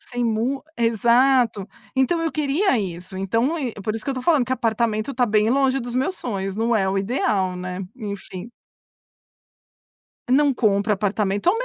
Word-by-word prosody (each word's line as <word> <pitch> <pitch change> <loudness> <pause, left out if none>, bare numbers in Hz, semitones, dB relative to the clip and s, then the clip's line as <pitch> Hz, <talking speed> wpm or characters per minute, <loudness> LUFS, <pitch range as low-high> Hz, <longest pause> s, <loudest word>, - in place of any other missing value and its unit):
Sem 245 -1 -4
mu 235 +5 -1
exato. 235 -1 +3 0.3
Então 305 +6 +1
eu 325 - -1
queria 300 - +1
isso. 185 -1 -5
Então, 230 - 0
ir 255 -7 -3
por 215 +2 -2
isso 225 - -5
que - - -6
eu - - 0
estou 255 -1 -5
falando 300 -4 +3
que 260 - -1
apartamento 225 -1 0
está 250 -2 +1
bem 215 0 +2
longe 270 0 +2
dos 240 0 -6
meus 270 +9 0
sonhos. 195 -4 -4
Não 230 +1 +1
é 195 -3 +2
o 190 - -1
ideal, 195 -4 0
né? 180 +1 -5 0.2
Enfim. 200 -2 -7 1.8
Não 285 +1 +4
compra 210 -3 +1
apartamento, 205 - +1
230 Hz, 165 wpm, -22 LUFS, 200-260 Hz, 1.8 s, Não